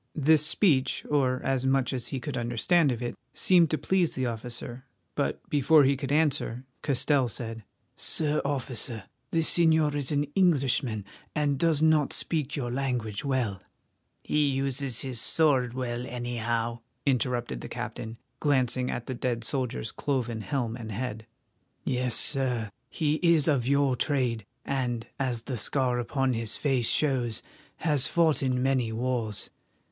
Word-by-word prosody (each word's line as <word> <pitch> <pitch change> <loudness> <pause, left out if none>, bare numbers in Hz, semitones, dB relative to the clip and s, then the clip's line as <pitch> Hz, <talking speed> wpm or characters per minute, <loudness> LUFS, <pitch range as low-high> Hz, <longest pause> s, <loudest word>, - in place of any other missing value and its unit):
This 155 0 +4
speech, 150 -4 +2
or 130 -3 +2
as 135 -1 0
much 135 -1 +1
as 120 -2 -3
he 135 - -3
could 145 0 -5
understand 130 +6 +2
of 120 0 -4
it, 120 - -3 0.2
seemed 175 -4 +4
to 155 - 0
please 185 -1 +1
the 130 - -1
officer, 120 +2 -5 0.3
but - - -2
before 150 +1 +5
he 140 +1 +3
could 135 0 -4
answer, 145 -5 +1 0.2
Castell 140 -1 +2
said: 115 -1 -5 0.3
"Sir 150 -1 +3
Officer, 125 -5 -2 0.3
the 165 - +1
señor 160 -2 +4
is 145 -2 -1
an 145 0 +2
Englishman, 135 - +2 0.3
and 145 -2 +1
does 160 -2 +2
not 155 -2 +3
speak 150 -3 -2
your 125 -5 -3
language 125 -6 -2
well—" 125 -9 -1 0.6
"He 150 -1 +1
uses 135 -3 -1
his 125 -4 -2
sword 130 -7 +3
well, 125 -1 -3
anyhow," 120 -1 -2 0.3
interrupted 120 - 0
the - - -7
captain, 115 +1 -6 0.2
glancing 130 -3 +1
at 120 - -4
the 130 - -4
dead 120 -2 -2
soldier's 125 - -2
cloven 120 -5 -2
helm 115 +2 -2
and 115 -2 -7
head. 110 0 -5 0.6
"Yes, 125 -2 0
Sir, 125 -7 +2 0.2
he 155 +1 0
is 170 -4 +4
of 135 -6 +2
your 140 -1 +3
trade 125 -7 -1 0.2
and, 125 -4 -2
as 125 -4 -1
the 130 -1 -4
scar 125 +2 +1
upon 130 +2 0
his 115 -1 -2
face 130 -5 +1
shows, 125 -6 0 0.3
has 145 -5 +3
fought 165 -3 +2
in 130 -2 0
many 130 -4 +1
wars. 115 -3 -2
130 Hz, 150 wpm, -27 LUFS, 120-145 Hz, 0.6 s, before